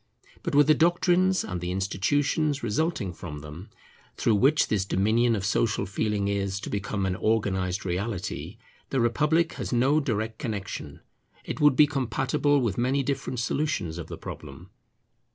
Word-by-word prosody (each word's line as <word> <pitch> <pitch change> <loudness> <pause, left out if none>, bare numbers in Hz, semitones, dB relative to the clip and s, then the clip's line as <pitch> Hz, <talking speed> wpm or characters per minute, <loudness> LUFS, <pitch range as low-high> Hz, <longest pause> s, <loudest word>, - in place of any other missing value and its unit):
But - - -2
with 145 0 +7
the 155 - +6
doctrines 175 +3 +3
and 90 -3 -5
the 90 - -3
institutions 140 - 0
resulting 115 - -1
from 75 -3 -8
them, 75 +6 -10 0.5
through 115 - +2
which 135 +9 +4
this 105 -3 +1
dominion 110 +5 +2
of 100 -2 -3
social 100 0 +1
feeling 100 0 -1
is 100 -1 -1
to - - -6
become 100 -1 -2
an 95 -1 -1
organized 95 -4 0
reality, 95 +2 -3 0.3
the 135 - 0
republic 150 +8 +2
has - - -4
no 130 +5 +3
direct 110 -5 -2
connexion; 100 - -5 0.4
it - - -5
would 150 -3 +6
be 150 - +7
compatible 140 +1 +1
with 115 -3 -1
many 135 +3 +1
different 135 -2 -3
solutions 110 - -1
of 80 - -6
the - - -7
problem. 85 +8 -9
110 Hz, 155 wpm, -26 LUFS, 95-140 Hz, 0.5 s, with